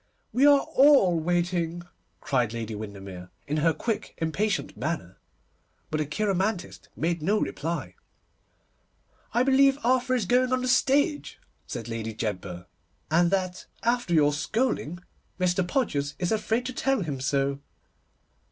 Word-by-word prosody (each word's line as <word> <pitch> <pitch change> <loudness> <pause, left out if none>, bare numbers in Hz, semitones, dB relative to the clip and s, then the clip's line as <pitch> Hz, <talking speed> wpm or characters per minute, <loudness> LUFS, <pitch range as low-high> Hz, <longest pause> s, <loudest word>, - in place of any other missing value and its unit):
'We 265 +5 +5
are 285 -1 +7
all 265 - +5
waiting,' 175 0 -1 0.4
cried 125 -5 0
Lady 115 -1 -4
Windermere, 100 -4 -8 0.2
in 150 - -2
her 165 +2 +3
quick, 225 +6 -3
impatient 195 +6 -1
manner, 155 - -4 0.7
but 155 - 0
the 155 - -1
cheiromantist 195 +3 -2
made 170 +1 -1
no 205 +7 +2
reply. 150 - -3 1.4
'I 240 +2 +3
believe 270 +1 +4
Arthur 255 +1 +2
is 235 -6 0
going 250 +5 +2
on 255 0 +1
the - - -1
stage,' 285 +4 +2 0.3
said 120 -2 -5
Lady 115 -1 -4
Jedburgh, 95 -5 -4 0.5
'and 170 +2 +4
that, 185 -1 -2 0.2
after 235 -6 +1
your 145 -2 +4
scolding, 175 - -1 0.4
Mr. 180 0 +2
Podgers 145 - -1
is 180 -1 -1
afraid 220 +2 0
to 255 - -4
tell 270 -1 +1
him 145 -6 -3
so. 140 0 0
175 Hz, 135 wpm, -27 LUFS, 140-240 Hz, 1.4 s, are